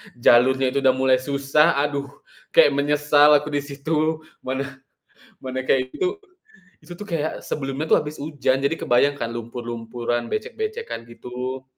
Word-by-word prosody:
jalurnya 130 +2 +4
itu 140 - 0
udah 130 -1 +3
mulai 130 -1 +3
susah 140 +4 +2
aduh, 140 0 -1 0.5
kayak 145 - +7
menyesal 145 +1 +4
aku 150 +1 0
di 145 - 0
situ, 155 +3 -2 0.2
mana 130 +1 -3 0.8
mana 130 0 -4
kayak 130 0 0
gitu. 375 +2 -1 0.6
Itu 175 +1 -11
tuh 210 - -7
kayak 160 -4 -2
sebelumnya 135 +2 -3
tuh - - +5
habis 150 +1 -8
hujan, 145 -3 0
jadi 140 +4 0
kebayang 140 +1 +2
kan 115 -4 -4
lumpur-lumpuran, 120 0 -4
becek-becekan, 435 - -4
gitu. 125 +2 -6
140 Hz, 145 wpm, -23 LUFS, 130-150 Hz, 0.8 s, kayak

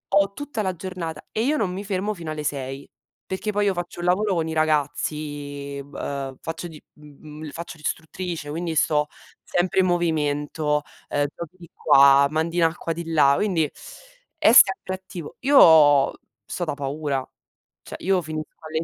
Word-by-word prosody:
ho 200 0 +3
tutta 290 -2 -4
la 190 -2 -1
giornata 170 -3 -6
e 220 - 0
io 295 +5 +1
non 190 -8 -1
mi 195 +2 -5
fermo 200 +1 -2
fino 170 -5 -6
alle 155 -1 -5
6. 135 -1 -4 0.4
Perché 190 +3 -3
poi 205 0 +1
io 200 - +2
faccio 175 -1 -6
un - - -3
lavoro 195 +2 +2
con 165 -1 0
i 160 - -3
ragazzi, 145 -2 -2
v 140 +1 -15
ehm, 135 -2 -4
faccio 165 +2 -5
di 160 -2 -11 0.2
mh 150 - -17 0.2
mhmm, 150 +1 -8
faccio 170 0 -8
l'istruttrice, 160 +1 -4
quindi 165 +2 -3
sto 150 0 +2 0.4
sempre 180 +2 0
in - - +2
movimento, 150 -3 0 0.3
ehm, 145 0 +1
giochi 170 0 -8
di 170 -3 -14
qua, 140 0 +6
mandi 160 +3 -1
in 170 - +4
acqua 165 0 0
di 165 0 -6
là, 140 -3 +5
quindi 185 -6 +1 0.7
è 310 -8 +5
sempre 190 -4 +6
attivo. 185 -4 -9
Io 160 - +7 0.3
sto 175 - -4
da 155 - -2
paura, 140 -1 -3 0.6
cioè - - -8
io 190 0 +1
finisco 155 -1 -6
alle 160 0 -3
160 Hz, 175 wpm, -23 LUFS, 150-185 Hz, 0.7 s, Io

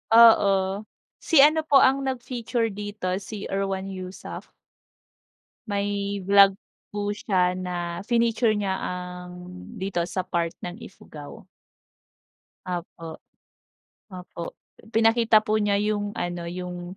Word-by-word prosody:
Oo. 200 -3 +5 0.3
Si 295 -5 +5
ano 315 +1 +4
po 275 - +6
ang 270 +1 +3
nag-feature 240 -3 -2
dito 205 -2 -4
si 205 +1 -7
Erwan 195 0 -2
Heussaff. 185 0 -8 1.2
May 200 -1 -2
vlog 195 0 +6 0.4
po 205 0 -1
siya 185 -3 +1
na 175 -2 -4
fineature 230 -2 +2
niya 195 -2 -1
ang 180 0 -6 0.4
dito 190 -3 -3
sa 185 0 -2
part 170 -2 -2
ng 175 +4 -6
Ifugao. 190 -2 -12 1.2
Opo. 170 -2 -6 0.9
Opo, 180 -2 -7 0.4
pinakita 225 -1 +4
po 215 +1 +1
niya 205 -1 +2
yung 205 -1 -1
ano, 175 -1 -3
yung, 180 +1 -6
200 Hz, 110 wpm, -25 LUFS, 180-220 Hz, 1.2 s, po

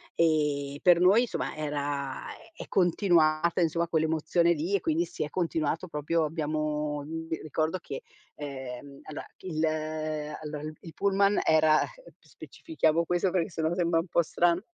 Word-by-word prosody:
Ehm, 150 -4 +1
per 175 -1 +6
noi, 195 +6 +6
insomma, 245 - -3
era 145 -3 -3
è 225 - -12
è - - -14
continuata, 170 -3 +3
insomma, 170 0 +1
quell'emozione 160 +1 +2
lì 170 +6 -1
e 195 - +1
quindi 160 +2 +1
si 165 - -4
è 150 - -4
continuato 165 0 -1
proprio 160 +1 0
abbiamo 150 -1 -2 0.4
ricordo 155 +3 -1
che, 135 -5 -7 0.3
ehm, 140 -1 -7
allora 155 - -7
il 160 -4 -3 0.8
allora 150 -1 -6
il 155 - -5
il 165 - -10
pullman 200 0 +2
era 155 -1 +5 0.4
specifichiamo 170 - -1
questo 175 +2 +1
perché 180 +1 0
sennò 160 -1 -1
sembra 170 -2 +2
un 165 - -3
po' 170 - +2
strano. 175 +3 +1
160 Hz, 145 wpm, -28 LUFS, 150-175 Hz, 0.8 s, per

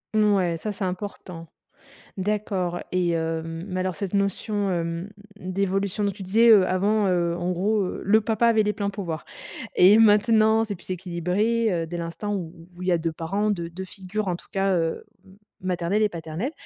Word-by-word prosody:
Mouais, 195 -6 +3
ça 210 +5 -4
c'est 200 - -5
important. 180 -2 -6 0.7
D'accord 190 -3 -1
et 180 -1 +1
hem, 165 +1 -3
mais 185 0 -2
alors 185 -1 -1
cette 200 -1 -4
notion, 200 0 0
hem, 170 +1 -2 0.3
d'évolution 195 +2 -1
donc 200 - +1
tu 200 - -10
disais, 220 +5 +4
heu, 200 -4 +7
avant, 205 +3 +2
heu, 175 -2 +1
en 175 +1 -1
gros, 200 +4 +1
heu, - - -5
le 215 +3 +5
papa 225 +2 +1
avait 220 -2 +4
les 210 0 0
pleins 200 -2 -2
pouvoirs 175 -6 -5 0.5
et 195 +4 +7
maintenant 220 0 +5
c'est 210 -2 -4
plus 180 - -14
équilibré, 190 +6 0
heu, 165 -2 -1
dès 175 +2 -5
l'instant 170 +5 -4
où 170 -4 -4 0.2
où 180 - -9
il 180 - -3
y 180 - +4
a 170 - +3
2 165 0 -2
parents 195 +7 -1
deu 170 -4 -3
deux 190 +3 -7
figures 195 +2 -4
en 180 - 0
tout - - -18
cas, 195 0 +1
heu, 165 -1 -1 0.2
m 190 0 -18 0.3
maternelle 185 +3 0
et 210 - +2
paternelle. 170 - -4
190 Hz, 195 wpm, -25 LUFS, 175-210 Hz, 0.7 s, heu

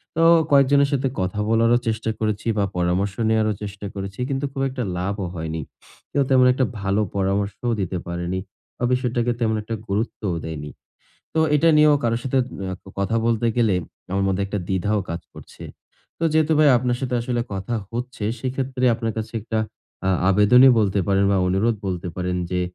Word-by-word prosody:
তো 165 - +2 0.3
কয়েকজনের 140 0 +5
সাথে 135 -1 +1
কথা 95 +2 -2
বলারও 115 +1 +4
চেষ্টা 110 0 -1
করেছি 110 0 -2
বা 100 - +2
পরামর্শ 90 +3 0 0.2
নেয়ারও 110 -1 +2
চেষ্টা 100 0 -7
করেছি 100 +1 -6
কিন্তু 135 +1 -1
খুব 135 -1 -4
একটা 130 -1 -4
লাভও 95 +1 -2
হয়নি। 80 0 -4 0.5
কেউ 140 - +2
তেমন 130 -1 +5
একটা 130 0 +1
ভালো 100 +2 +1
পরামর্শও 100 +4 -1
দিতে 95 0 -2
পারেনি 85 +1 -3 0.4
বা - - -5
বিষয়টাকে 120 -1 0
তেমন 110 -2 +1
একটা 115 +2 -4
গুরুত্বও 100 -2 -2
দেয়নি। 75 -2 -6 0.7
তো 160 - +2
এটা 150 +3 +4
নিয়েও 150 -1 +6
কারো 115 -1 +1
সাথে 135 +1 0 0.3
আ - - -3 0.2
কথা 100 +4 0
বলতে 115 0 +1
গেলে 110 -5 +3 0.4
আমার 95 0 +1
মধ্যে 95 +1 0
একটা 105 +1 -3
দ্বিধাও 100 +3 0
কাজ 85 - -3
করছে। - - -13 0.6
তো 165 - -1
যেহেতু 155 0 +3
ভাই 155 -1 +6
আপনার 120 0 0
সাথে 130 -1 -2
আসলে 120 0 -1
কথা 95 +5 -3 0.2
হচ্ছে 120 -2 -5 0.2
সেক্ষেত্রে 130 0 -2
আপনার 115 -1 -2
কাছে 110 - -5
একটা 110 0 -2 0.5
আ - - +2 0.2
আবেদনই 115 +7 +7
বলতে 100 -2 +1
পারেন 100 0 +3
বা - - +3
অনুরোধ 105 +5 +2
বলতে 90 -2 -3
পারেন 90 0 -2
যে 90 -1 0
110 Hz, 175 wpm, -22 LUFS, 95-125 Hz, 0.7 s, আবেদনই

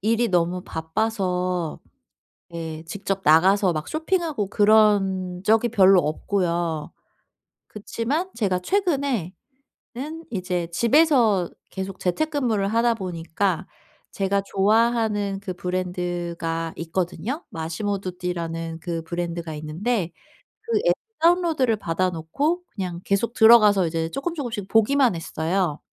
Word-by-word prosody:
일이 230 +3 +1
너무 180 0 +1
바빠서 180 -1 -2 0.7
예 160 -1 -6
직접 195 +2 -3
나가서 185 +4 +5
막 155 -1 -4
쇼핑하고 315 - -1
그런 200 -4 +3
적이 225 +3 +3
별로 195 -4 +6
없고요. 170 -1 -1 0.8
그치만 250 - -3
제가 195 -5 0
최근에 280 - 0 0.6
는 310 +6 -6
이제 180 -4 -2
집에서 235 - +3 0.2
계속 190 0 -6
재택근무를 240 - 0
하다 230 +1 +2
보니까 185 -1 -2 0.5
제가 200 0 0
좋아하는 210 -1 +1
그 195 -2 -5
브랜드가 175 -2 -3
있거든요. 185 - -3
마시모두띠라는 170 -2 -4
그 165 -1 -4
브랜드가 170 -1 -4
있는데 170 +5 -2 0.5
그 450 -1 0
앱 - - +6 0.3
다운로드를 330 -9 +3
받아 185 -1 -1
놓고 280 - -2
그냥 180 -4 -5
계속 200 +5 0
들어가서 215 -5 +6
이제 165 0 -2
쪼끔쪼금씩 270 - -4
보기만 235 0 +3
했어요. 165 0 -1
195 Hz, 265 characters per minute, -23 LUFS, 170-230 Hz, 0.8 s, 별로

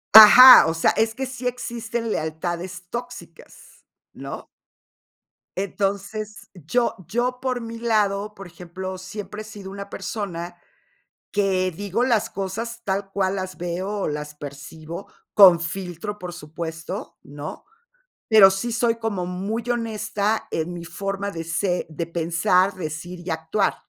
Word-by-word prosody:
Ajá, 240 0 +12
o 160 - 0
sea, 165 - +3
es 225 0 0
que 265 - -3
sí 255 -1 -5
existen 235 -2 -3
lealtades 175 +3 -3
tóxicas, 240 +1 -9 0.3
¿no? - - -8 1.1
Entonces, 200 +2 -3
yo 210 - 0
yo 245 +5 -1
por 250 -2 -2
mi 230 0 -7
lado, 210 -3 0
por 195 -2 -10
ejemplo, 185 +1 -7
siempre 205 +3 -7
he - - -14
sido 205 -3 -9
una 200 0 -8
persona 175 -5 -5 0.7
que 190 -2 +1
digo 205 +6 -2
las 225 -3 +2
cosas 225 +5 -5
tal 195 0 -2
cual 195 -1 0
las 185 -1 -5
veo, 175 +2 -3
o - - 0
las 150 0 -4
percibo 155 +5 -9 0.2
con 185 -5 +8
filtro, 180 +3 -5
por 180 -3 -7
supuesto, 165 0 -7
¿no? 145 +2 -8 0.6
Pero 215 -4 +8
sí 210 +5 -2
soy 230 0 +1
como 210 -6 -3
muy 205 +6 -4
honesta 220 -2 -1
en 165 +2 -2
mi 170 -1 -7
forma 195 +2 -4
de 165 -3 -6
se 175 +2 -1
de 165 +1 -4
pensar, 175 +3 +2
decir 175 +1 -6
y 175 - -3
actuar, 160 +5 0
195 Hz, 140 wpm, -23 LUFS, 175-220 Hz, 1.1 s, Ajá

